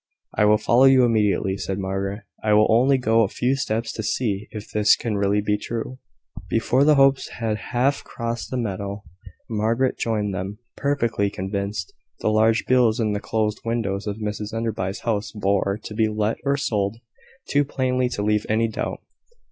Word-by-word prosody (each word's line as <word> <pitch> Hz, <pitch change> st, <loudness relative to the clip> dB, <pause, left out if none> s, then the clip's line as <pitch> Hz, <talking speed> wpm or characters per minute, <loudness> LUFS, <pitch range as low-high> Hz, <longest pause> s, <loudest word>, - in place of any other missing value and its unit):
"I 105 Hz, -, +3 dB
will 105 Hz, 0 st, +5 dB
follow 120 Hz, +4 st, +4 dB
you 135 Hz, -1 st, +6 dB
immediately," 105 Hz, -4 st, +1 dB
said 95 Hz, -1 st, -3 dB
Margaret: 95 Hz, +2 st, -3 dB, 0.2 s
"I 105 Hz, -1 st, +3 dB
will 105 Hz, +1 st, +6 dB
only 130 Hz, +4 st, +4 dB
go 115 Hz, -3 st, +3 dB
a 110 Hz, -, +3 dB
few 125 Hz, +6 st, 0 dB
steps 115 Hz, -3 st, -2 dB
to -, -, -4 dB
see 105 Hz, -2 st, -1 dB
if 105 Hz, -1 st, -9 dB
this 105 Hz, 0 st, +4 dB
can 115 Hz, -3 st, -3 dB
really 100 Hz, +1 st, +1 dB
be 105 Hz, 0 st, 0 dB
true." 120 Hz, +4 st, -5 dB, 0.5 s
Before 125 Hz, +4 st, +2 dB
the 150 Hz, +1 st, +5 dB
Hopes 135 Hz, -1 st, +4 dB
had 110 Hz, -2 st, -2 dB
half 130 Hz, +3 st, +1 dB
crossed 115 Hz, 0 st, -5 dB
the 130 Hz, -, -3 dB
meadow, 100 Hz, -2 st, -4 dB, 0.4 s
Margaret 115 Hz, +4 st, 0 dB
joined 105 Hz, -3 st, -1 dB
them, 95 Hz, +3 st, -4 dB, 0.2 s
perfectly 120 Hz, -8 st, 0 dB
convinced. 100 Hz, -, -4 dB, 0.3 s
The -, -, 0 dB
large 110 Hz, +1 st, +3 dB
bills 125 Hz, -3 st, +3 dB
in 110 Hz, -2 st, +1 dB
the 105 Hz, -, -1 dB
closed 105 Hz, 0 st, -1 dB
windows 110 Hz, -4 st, -2 dB
of 105 Hz, 0 st, -3 dB
Mrs 105 Hz, 0 st, -4 dB
Enderby's 110 Hz, -4 st, -3 dB
house 110 Hz, -3 st, -1 dB
bore 100 Hz, -1 st, 0 dB
"To -, -, -7 dB
be 110 Hz, 0 st, +2 dB
Let 105 Hz, +1 st, -1 dB
or 140 Hz, 0 st, +1 dB
Sold" 105 Hz, -5 st, -1 dB, 0.5 s
too 145 Hz, 0 st, +3 dB
plainly 130 Hz, -2 st, 0 dB
to 105 Hz, -4 st, -3 dB
leave 105 Hz, 0 st, +1 dB
any 110 Hz, +1 st, +2 dB
doubt. 110 Hz, -, -4 dB
110 Hz, 180 wpm, -23 LUFS, 105-120 Hz, 0.5 s, you